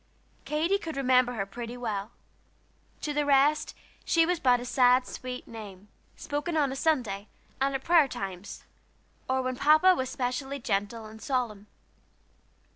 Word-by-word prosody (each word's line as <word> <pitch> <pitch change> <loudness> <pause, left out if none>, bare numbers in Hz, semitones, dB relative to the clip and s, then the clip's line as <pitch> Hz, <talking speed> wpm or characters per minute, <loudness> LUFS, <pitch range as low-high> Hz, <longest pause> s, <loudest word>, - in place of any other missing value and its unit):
Katy 330 +6 +1
could 320 -6 -6
remember 255 -2 +3
her 200 -4 -2
pretty 235 +4 -7
well; 215 -4 -3 0.9
to 300 - -2
the 295 0 +1
rest 285 +2 +3 0.3
she 330 -1 +3
was 355 0 0
but 250 -2 +4
a 245 - -6
sad, 250 0 +4
sweet 255 0 -7
name, 205 -3 -10 0.3
spoken 295 +3 -3
on 280 -3 +1
Sunday, 240 -10 0 0.3
and 275 0 +1
at 265 - -3
prayer 335 -4 +5
times, 195 -5 -7 0.7
or 260 0 +1
when 255 0 -2
Papa 310 +7 +6
was 260 -7 -2
especially 265 +2 -3
gentle 220 -1 -2
and 220 +1 -12
solemn. 240 -7 -2
255 Hz, 145 wpm, -28 LUFS, 225-290 Hz, 0.9 s, Papa